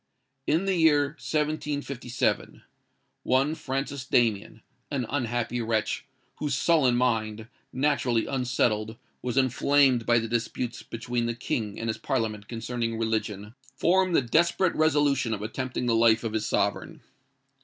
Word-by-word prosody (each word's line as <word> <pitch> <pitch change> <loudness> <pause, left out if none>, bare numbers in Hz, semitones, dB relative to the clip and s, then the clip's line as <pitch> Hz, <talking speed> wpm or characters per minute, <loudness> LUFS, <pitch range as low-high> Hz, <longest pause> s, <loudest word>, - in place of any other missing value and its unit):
"In 165 +6 +2
the 195 - +1
year 150 -4 +4
1757, 145 -5 -2 0.6
one 135 +4 +2
Francis 135 -2 -3
Damien, 110 -4 0 0.3
an 135 -4 -2
unhappy 120 -2 -2
wretch, 110 -2 -1 0.3
whose 145 -3 -1
sullen 140 -5 +3
mind, 110 -3 0 0.2
naturally 130 -4 +1
unsettled, 120 -4 0 0.2
was 125 0 -3
inflamed 130 -1 +3
by 120 0 +5
the 115 0 0
disputes 120 +1 -3
between 120 +1 -3
the 115 - -2
King 110 -3 -3
and 115 - -3
his 110 -1 -2
Parliament 110 -4 -2
concerning 115 0 -3
religion, 110 -2 -2 0.2
formed 185 +4 +2
the 135 - +4
desperate 170 +7 +2
resolution 145 -6 +2
of 105 - -7
attempting 125 +3 -3
the 120 - +2
life 115 0 +4
of 115 -2 -3
his 110 -1 -1
Sovereign. 100 -2 -1
120 Hz, 135 wpm, -27 LUFS, 115-140 Hz, 0.6 s, by